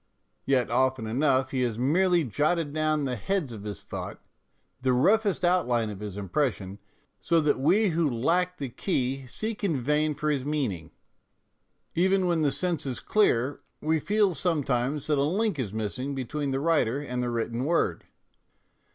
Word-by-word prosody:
Yet 130 -4 +1
often 130 -1 +1
enough 130 +3 +1
he 130 - -1
has 120 -3 -1
merely 170 +7 +3
jotted 150 - 0
down 155 -1 +1
the 125 -2 -1
heads 170 - -2
of 105 -2 -9
his 100 -4 -6
thought, - - -6 0.6
the 130 0 +2
roughest 200 - +3
outline 120 -11 +2
of 100 - -8
his 105 -2 -6
impression, 100 - -2 0.4
so 170 -1 +2
that 150 -4 +1
we 190 +10 +3
who 165 -2 +1
lack 175 +9 0
the 140 -5 -4
key 135 -2 -2
seek 215 - -5
in 165 -9 +1
vain 150 +4 +1
for 150 +1 -1
his 140 -3 -1
meaning. 130 - -2 1.0
Even 190 +2 +2
when 170 -2 +1
the 150 - +3
sense 170 -1 -2
is 125 -3 -3
clear, 140 - +1 0.2
we 160 +1 +1
feel 205 +2 +2
sometimes 145 -5 -1
that 150 -2 +1
a - - +3
link 190 +2 0
is 110 -7 -2
missing 110 +6 -3
between 140 +3 -3
the 135 0 -1
writer 145 -6 +2
and 125 -4 -3
the 125 - -1
written 115 +1 -2
word. 165 +4 0
140 Hz, 170 wpm, -27 LUFS, 125-165 Hz, 1.0 s, merely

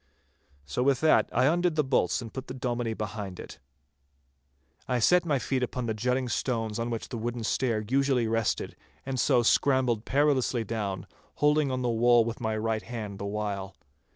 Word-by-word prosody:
So 75 +12 -2
with 135 0 +3
that 155 - +4
I 130 - +2
undid 175 +3 +2
the 150 - +2
bolts 130 -2 +1
and 115 - -9
put 130 0 -6
the 130 - -6
Dominie 120 -3 -2
behind 105 -3 -5
it. - - -10 1.3
I 125 - +1
set 180 +9 +4
my 145 -3 +2
feet 130 0 -1
upon 125 0 -2
the 110 - -1
jutting 125 +4 0
stones 115 -2 -2
on 115 +1 -2
which 115 -2 -4
the 120 - -5
wooden 120 +1 -3
stair 115 -2 0
usually 135 -1 +2
rested, 115 -1 -1 0.3
and 130 -1 -3
so 120 +1 +3
scrambled 125 -2 +2
perilously 135 -3 +1
down, 100 -4 -3 0.3
holding 150 -1 +3
on 130 -1 -2
to - - -3
the 120 - +1
wall 120 0 +4
with 115 0 -5
my 110 -1 -1
right 110 0 -1
hand 110 -5 -6
the 100 - -4
while. 100 -2 -4
120 Hz, 185 wpm, -28 LUFS, 110-130 Hz, 1.3 s, that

